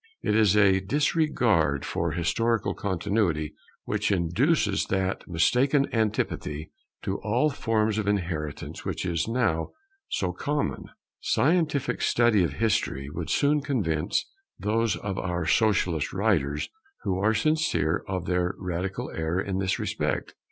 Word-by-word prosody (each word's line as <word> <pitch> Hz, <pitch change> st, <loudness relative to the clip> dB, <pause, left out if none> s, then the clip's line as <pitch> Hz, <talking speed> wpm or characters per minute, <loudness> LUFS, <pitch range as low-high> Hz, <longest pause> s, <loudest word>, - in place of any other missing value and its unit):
It 105 Hz, -, +1 dB
is 105 Hz, -2 st, +4 dB
a 95 Hz, -2 st, +5 dB
disregard 115 Hz, -, +1 dB
for -, -, -1 dB
historical 115 Hz, +7 st, 0 dB
Continuity 90 Hz, -5 st, -1 dB, 0.3 s
which 105 Hz, 0 st, -1 dB
induces 100 Hz, -, +2 dB
that 95 Hz, 0 st, -1 dB
mistaken 130 Hz, -, +3 dB
antipathy 105 Hz, -9 st, -1 dB, 0.3 s
to 95 Hz, -, -2 dB
all 120 Hz, +8 st, +1 dB
forms 110 Hz, -5 st, 0 dB
of 105 Hz, -, -2 dB
inheritance 85 Hz, -7 st, -2 dB
which -, -, -3 dB
is 85 Hz, 0 st, -1 dB
now 115 Hz, -9 st, 0 dB, 0.4 s
so 90 Hz, -2 st, -1 dB
common. 145 Hz, +10 st, -2 dB, 0.3 s
Scientific 150 Hz, -3 st, +1 dB
study 115 Hz, -5 st, +3 dB
of 85 Hz, -, -1 dB
history 105 Hz, -, 0 dB
would 80 Hz, 0 st, -5 dB
soon 145 Hz, +1 st, +2 dB
convince 105 Hz, -, 0 dB, 0.3 s
those 110 Hz, +1 st, +1 dB
of 95 Hz, -2 st, -4 dB
our 90 Hz, -2 st, -2 dB
socialist 90 Hz, -7 st, +2 dB
writers 70 Hz, +2 st, 0 dB, 0.3 s
who 95 Hz, -1 st, -1 dB
are 110 Hz, +3 st, +2 dB
sincere 155 Hz, -, +1 dB
of 95 Hz, -3 st, -3 dB
their 90 Hz, 0 st, 0 dB
radical 90 Hz, +1 st, -3 dB
error 80 Hz, +2 st, -1 dB
in 95 Hz, -1 st, -2 dB
this 95 Hz, -1 st, 0 dB
respect. -, -, -2 dB
100 Hz, 130 wpm, -26 LUFS, 85-115 Hz, 0.4 s, a